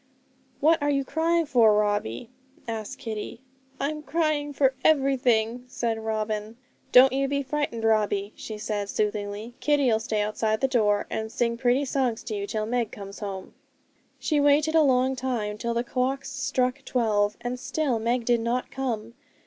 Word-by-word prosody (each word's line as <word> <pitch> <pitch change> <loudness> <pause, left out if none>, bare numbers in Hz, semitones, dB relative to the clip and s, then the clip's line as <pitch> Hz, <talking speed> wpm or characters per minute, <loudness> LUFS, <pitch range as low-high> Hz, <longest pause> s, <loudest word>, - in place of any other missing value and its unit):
'What 315 +1 +4
are 290 - +1
you 275 -1 +1
crying 330 +3 +1
for, 230 -7 +5
Robbie?' 205 - -1 0.4
asked 220 -2 -5
Kitty. 225 +1 -6 0.4
'I'm 300 +2 -2
crying 300 0 0
for 270 -2 +2
everything,' 250 -5 +2
said 230 -3 -2
Robin. 215 0 -3 0.3
'Don't 260 +1 +8
you 275 +1 +1
be 280 0 -1
frightened, 265 -4 -2
Robbie,' 210 -2 +1
she 215 - -7
said 210 -1 -3
soothingly; 210 +2 -2
'Kitty'll 275 -7 +2
stay 220 -2 -1
outside 215 +1 0
the 270 - +2
door, 210 -5 +2
and 220 0 -3
sing 235 0 0
pretty 250 +3 +2
songs 255 -4 -1
to 215 - -4
you, 200 0 -3
till 215 +1 -2
Meg 235 -1 -1
comes 200 -1 -9
home.' 195 -3 -6 0.6
She 305 -2 0
waited 290 +2 +3
a 325 - +6
long 260 -2 +3
time, 240 -5 -2
till 235 +1 -2
the 235 - +1
clocks 260 +3 -2
struck 265 -2 -1
twelve, 210 -4 +1
and 245 +1 -4
still 270 -2 -1
Meg 235 +1 0
did 240 -1 +3
not 240 +2 -2
come. 235 -4 -3
240 Hz, 165 wpm, -26 LUFS, 215-270 Hz, 0.6 s, Don't